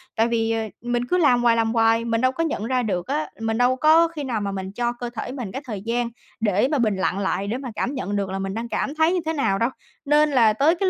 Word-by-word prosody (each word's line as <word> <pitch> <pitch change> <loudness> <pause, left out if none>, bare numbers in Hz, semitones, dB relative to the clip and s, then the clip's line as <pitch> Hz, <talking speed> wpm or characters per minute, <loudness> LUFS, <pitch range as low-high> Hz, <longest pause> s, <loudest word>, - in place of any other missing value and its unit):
Tại 225 +1 +3
vì, 225 -1 0
ờ, 225 0 0 0.2
mình 240 0 -1
cứ 360 - +1
làm 250 -8 +4
hoài, 235 -1 +5
làm 225 0 +1
hoài, 225 0 +3
mình 230 0 0
đâu 255 0 +3
có 330 +5 -2
nhận 225 -9 -2
ra 255 0 0
được 185 -1 -2
á, 300 +3 -2
mình 225 0 -1
đâu 250 +1 +3
có 315 +4 +5
khi 315 -3 -6
nào 235 -5 -2
mà 200 -1 -2
mình 190 0 -5
cho 240 +1 -1
cơ 240 0 -6
thể 245 - -4
mình 245 -8 -5
cái 265 - -5
thời 210 -6 -5
gian 235 +2 -1 0.3
để 210 +2 +2
mà 295 - +2
bình 215 -4 +2
lặng 190 0 -1
lại 195 0 -1
để 235 +4 -2
mà 260 -2 -6
cảm 265 - -2
nhận 205 -5 -3
được 200 -2 -1
là 195 - -3
mình 195 0 -3
đang 230 +1 -4
cảm 290 - -2
thấy 320 +3 +3
như 365 - +1
thế 320 - -1
nào 220 -10 +1
đâu. 230 +2 +2 0.4
Nên 295 +1 +4
là 230 -5 +4
tới 300 +9 +3
cái 380 +2 +1
235 Hz, 290 wpm, -23 LUFS, 220-275 Hz, 0.4 s, hoài